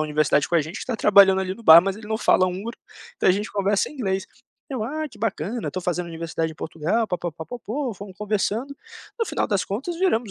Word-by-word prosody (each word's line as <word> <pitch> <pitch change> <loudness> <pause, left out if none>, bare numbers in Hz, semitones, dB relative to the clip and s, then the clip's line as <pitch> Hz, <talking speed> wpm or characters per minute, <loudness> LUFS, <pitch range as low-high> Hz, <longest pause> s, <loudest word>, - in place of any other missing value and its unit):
Universidade 150 -1 +2
com - - -2
a - - +4
gente 155 +5 -6
que - - -6
está 255 - -3
trabalhando 195 -2 +6
ali 190 0 -3
no 230 - -14
bar, 160 -3 +10
mas 195 +1 -2
ele 215 0 -11
não 220 +1 -2
fala 185 - +4
húngaro, 195 +6 -5 0.4
então - - +2
a - - +7
gente 205 +3 -3
conversa 200 0 +1
em - - -13
inglês". 195 -7 -2 0.4
Eu: 250 -5 -2
"Ah, 310 +5 -3
que 230 - -17
bacana, 220 +1 -2
eu - - -1
estou 185 - -4
fazendo 180 0 -2
Universidade 165 -1 -3
em - - -15
Portugal, 165 +9 -1
pa-pa-pa-po-po", 215 - -4
fomos 195 0 -10
conversando, 215 +6 -2 0.4
no 455 - +1
final - - -1
das 200 -3 0
contas 270 - -4
viramos 245 - +1
200 Hz, 225 wpm, -23 LUFS, 175-230 Hz, 0.4 s, bar